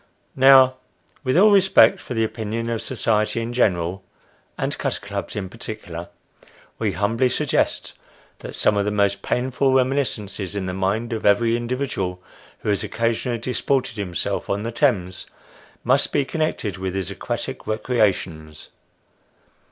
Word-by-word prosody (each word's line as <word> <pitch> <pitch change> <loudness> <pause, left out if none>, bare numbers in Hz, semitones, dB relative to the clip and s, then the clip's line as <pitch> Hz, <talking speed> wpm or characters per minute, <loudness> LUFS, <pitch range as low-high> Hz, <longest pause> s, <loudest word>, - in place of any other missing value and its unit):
Now, 130 -1 +7 0.5
with 130 +3 +1
all 210 +3 +7
respect 195 0 +5
for 125 - -6
the 115 - +2
opinion 110 +1 -3
of 115 - -2
society 110 -3 0
in 115 +1 -4
general, 95 -5 +1 0.5
and - - -1
cutter - - -2
clubs 100 -3 -6
in 100 -3 -3
particular, 90 -5 -7 0.7
we - - 0
humbly 115 +5 +1
suggest - - 0 0.5
that - - -8
some 105 - +2
of 100 - +1
the - - +1
most 100 -1 +1
painful 130 +2 0
reminiscences 120 -7 0
in 100 -2 -2
the 90 - -3
mind 105 +5 -1
of 110 - -4
every 115 +3 +3
individual 120 -7 -2 0.4
who - - -3
has 100 - +1
occasionally 115 +1 -1
disported 125 +1 -1
himself 90 -5 -3
on 100 +1 -1
the 115 - -3
Thames, 95 -9 0 0.6
must 135 +4 +3
be 145 -2 +1
connected 135 - -2
with 95 0 -3
his 95 -3 -2
aquatic - - -5
recreations. 95 -9 -1
110 Hz, 145 wpm, -22 LUFS, 100-125 Hz, 0.7 s, Now